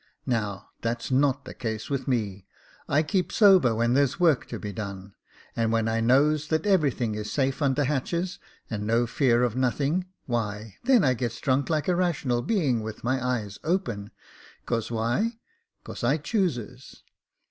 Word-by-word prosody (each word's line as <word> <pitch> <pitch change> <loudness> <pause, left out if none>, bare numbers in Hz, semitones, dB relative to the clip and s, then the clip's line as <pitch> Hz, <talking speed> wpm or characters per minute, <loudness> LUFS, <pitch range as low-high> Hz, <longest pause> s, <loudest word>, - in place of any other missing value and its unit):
Now 105 -5 -2
that's 115 +2 -3
not 140 +1 +2
the - - -8
case 110 -3 -4
with 140 -1 -3
me, 105 -7 -2 0.4
I 150 +2 +3
keep 180 +4 0
sober 185 - +5
when 115 +2 +2
there's 140 +2 +2
work 165 -6 +3
to - - -5
be 105 -1 -6
done; 100 -1 -6 0.4
and 115 -1 +1
when 115 -1 +1
I 115 0 0
knows 145 +5 +3
that 160 +2 0
everything 145 - +2
is 105 0 -5
safe 135 +1 0
under 140 0 +2
hatches, 170 +6 -2 0.3
and 105 -2 -4
no 115 +2 +3
fear 120 0 +2
of 120 -2 0
nothing, 140 +8 0 0.2
why 105 -4 -3
then 250 -4 +5
I 130 - +4
gets 120 -2 -3
drunk 135 -1 +1
like 155 -2 0
a 180 - +2
rational 150 -9 0
being, 145 - +1
with 110 0 -7
my 130 +1 0
eyes 110 -6 -2
open 120 - -1 0.3
— - - -23
'cause 115 -2 -1
why 120 - 0 0.2
— 465 - -50
'cause - - -8
I 135 +6 +3
chooses." 140 - -3
125 Hz, 175 wpm, -26 LUFS, 115-150 Hz, 0.4 s, sober